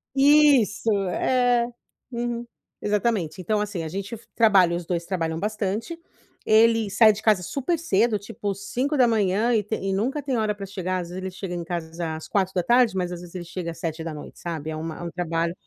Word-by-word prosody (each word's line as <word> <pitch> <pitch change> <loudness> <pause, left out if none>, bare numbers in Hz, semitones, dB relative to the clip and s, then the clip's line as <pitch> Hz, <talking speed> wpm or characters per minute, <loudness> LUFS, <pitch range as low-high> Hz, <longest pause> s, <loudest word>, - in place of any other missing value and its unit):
Isso. 275 -6 +5 0.2
É. 245 +1 +2 0.4
Uhum, 240 0 -3 0.4
exatamente. 205 -5 0
Então, 210 +4 0
assim, 200 -5 -3
a - - -4
gente 200 +6 -5
f 225 - -15
trabalha 195 -6 +5
os 175 -1 -4
2 170 -1 -2
trabalham 165 -3 -2
bastante. 215 - -3 0.5
Ele 225 -1 +4
sai 215 +2 +6
de 210 +1 -6
casa 210 -5 +3
super 285 - -1
cedo, 230 - +2
tipo 200 0 -4
5h 230 -2 +1
e 220 - +3
te 210 +2 -3
e 195 0 -3
nunca 260 +9 -1
tem 265 -4 -1
hora 215 -1 0
pra 200 -1 -6
chegar 185 -1 -3
às 175 -1 -6
vezes 180 - -7
ele 190 - -3
chega 185 -1 -6
em 175 -1 -3
casa 165 -1 -4
às 155 - -8
16h 195 +4 +2
mas, 180 -1 -1
às 175 - -5
vezes, 175 +1 -12
ele 175 - -4
chega 170 -1 -5
às 165 - -11
19h, 160 -2 -6
sabe. 160 -3 -5
É 155 - -4
uma 160 0 -5
é - - -9
um 170 - -5
trabalho 165 -1 -1
200 Hz, 195 wpm, -24 LUFS, 175-230 Hz, 0.5 s, sai